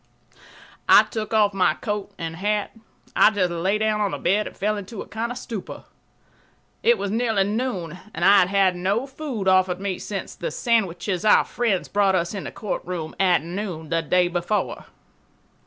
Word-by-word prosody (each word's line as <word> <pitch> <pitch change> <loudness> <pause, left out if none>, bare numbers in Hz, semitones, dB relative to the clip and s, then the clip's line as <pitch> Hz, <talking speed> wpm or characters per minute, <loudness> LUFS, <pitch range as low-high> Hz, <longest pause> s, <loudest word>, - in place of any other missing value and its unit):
I - - +9
took 220 -2 -5
off 210 -2 +3
my 185 -2 +2
coat 205 -1 -4
and 165 0 -5
hat. 210 +3 -1 0.4
I - - +7
just 190 -5 0
lay 185 +5 0
down 215 0 0
on 205 - +1
the - - -4
bed 205 +4 +1
and - - -11
fell 210 +2 0
into 205 +1 -6
a - - -18
kind 225 +3 -3
of 245 - -5
stupor. 225 -6 -7 1.0
It 475 +1 +4
was 200 - -3
nearly 225 -3 +1
noon 195 -6 -3 0.2
and - - 0
I 200 - +7
had 180 - +4
had 195 -1 +2
no 195 +8 0
food 265 -7 -5
offered 185 -1 +3
me 195 -2 -3
since 195 -2 -5
the - - -4
sandwiches 195 -4 0
our 215 - +5
friends 225 -6 -1
brought 200 -2 +2
us 170 0 -1
in 200 - -5
the - - -5
courtroom 180 -6 -5
at 180 -5 +3
noon 170 -3 -5
the 165 +1 +1
day 180 +2 +2
before. 175 +4 -2
200 Hz, 185 wpm, -23 LUFS, 180-215 Hz, 1.0 s, I